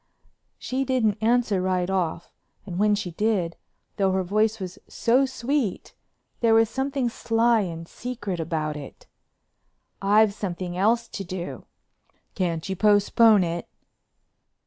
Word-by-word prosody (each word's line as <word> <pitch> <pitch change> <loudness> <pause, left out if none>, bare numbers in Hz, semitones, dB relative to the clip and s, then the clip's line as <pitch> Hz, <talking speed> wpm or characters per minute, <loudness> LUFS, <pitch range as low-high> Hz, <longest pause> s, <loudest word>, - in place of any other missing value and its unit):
She 260 +1 -2
didn't 235 -6 +1
answer 225 -4 +2
right 185 -1 0
off 180 -3 -2 0.3
and 180 -2 -5
when 210 0 +4
she 190 -4 -4
did, 185 -3 0 0.4
though 195 -1 +2
her 190 0 +1
voice 215 +4 +1
was 185 -2 -7
so 255 +4 +2
sweet, 260 -4 -2 0.5
there 230 -2 +4
was 225 0 +4
something 270 -1 -1
sly 230 0 +2
and 165 -4 -4
secret 205 -7 -5
about 155 -2 -2
it. 145 -2 -10 1.0
"I've 205 +1 +4
something 180 -3 -4
else 230 +5 +2
to 195 - -5
do." 180 -1 -6 0.7
"Can't 170 -4 -2
you 190 - -2
postpone 210 +1 +5
it?" 170 0 -3
205 Hz, 130 wpm, -25 LUFS, 180-230 Hz, 1.0 s, postpone